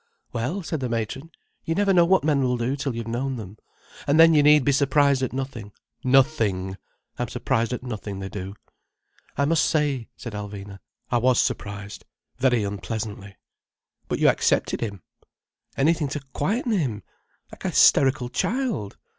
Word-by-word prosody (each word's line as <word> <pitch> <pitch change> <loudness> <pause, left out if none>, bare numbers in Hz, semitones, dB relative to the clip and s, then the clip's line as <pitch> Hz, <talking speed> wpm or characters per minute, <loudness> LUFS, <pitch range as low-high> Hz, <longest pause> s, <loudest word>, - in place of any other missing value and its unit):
"Well," 130 - -2
said 160 -1 -3
the 130 -2 -3
matron. 115 +7 -3 0.3
"You 165 - -2
never 200 0 +3
know 175 -2 +6
what 190 +2 +3
men 145 -2 +2
will 125 -1 +1
do 120 +3 -1
till 135 -3 -3
you've 115 -1 -4
known 130 +3 -2
them. 105 -3 -9 0.5
And 145 +3 +3
then 165 0 +8
you 150 - +5
need 150 -1 +5
be 140 - +4
surprised 140 0 +3
at 130 - -1
nothing, 130 -6 -5 0.3
nothing. 115 -9 +2 0.4
I'm 120 - -1
surprised 120 -1 -1
at 125 - -4
nothing 105 -5 -5
they 95 0 -5
do—" 95 0 -7 0.8
"I 140 - +2
must 165 +2 +3
say," 145 -6 0
said 115 -5 -7
Alvina, 100 -1 -7 0.3
"I 120 - +3
was 125 0 +3
surprised. 100 0 -3 0.4
Very 125 -4 +3
unpleasantly." 100 0 -5 0.7
"But - - -1
you - - +3
accepted - - +2
him—" 100 -6 -5 0.7
"Anything 155 +2 +2
to 150 +2 -4
quieten 225 - -1
him—like 135 - -5
a - - 0
hysterical 130 -3 +4
child." 210 - -2
125 Hz, 160 wpm, -24 LUFS, 105-145 Hz, 0.8 s, then